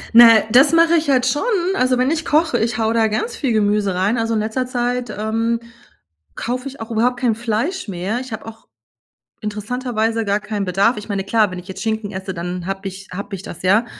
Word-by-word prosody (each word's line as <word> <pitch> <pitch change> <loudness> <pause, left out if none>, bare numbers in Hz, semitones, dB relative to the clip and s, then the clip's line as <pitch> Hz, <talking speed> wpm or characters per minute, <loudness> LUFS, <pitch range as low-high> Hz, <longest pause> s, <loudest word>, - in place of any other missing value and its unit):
Na, 230 -2 +9
das 270 +6 +6
mache 330 0 +5
ich 315 -3 +1
halt 255 -2 +3
schon. 260 +3 +1 0.3
Also, 255 -6 +2
wenn 255 +3 +2
ich 325 0 -1
koche, 320 +3 +2
ich 225 0 0
haue 225 0 +1
da 225 -1 +3
ganz 220 - -2
viel 270 -5 -1
Gemüse 205 -3 +1
rein. 195 +6 +1
Also, 225 0 0
in - - +1
letzter 225 +4 -2
Zeit, 245 -1 -2
ähm, 225 +2 -1 0.8
kaufe 250 +3 -3
ich 275 0 -9
auch 225 - -7
überhaupt 245 +2 +1
kein 245 -3 +2
Fleisch 235 - -2
mehr. 195 +5 -3
Ich 255 -1 -8
habe 220 - -6
auch 225 0 -11 0.7
interessanterweise 225 +1 -2
gar 200 0 +1
keinen 205 0 -3
Bedarf. 195 +6 +2
Ich 210 - -9
meine, 200 -2 -2
klar, 215 -1 +2
wenn 180 - -6
ich 180 - -10
jetzt 190 0 -7
Schinken 220 -2 -2
esse, 190 +1 -5
dann 175 +1 -4
habe 195 +1 -4
ich 190 0 -10
habe 200 +2 -6
ich 185 - -10
das, 175 - -9
ja. 205 +6 +3
225 Hz, 220 wpm, -19 LUFS, 205-250 Hz, 0.8 s, Na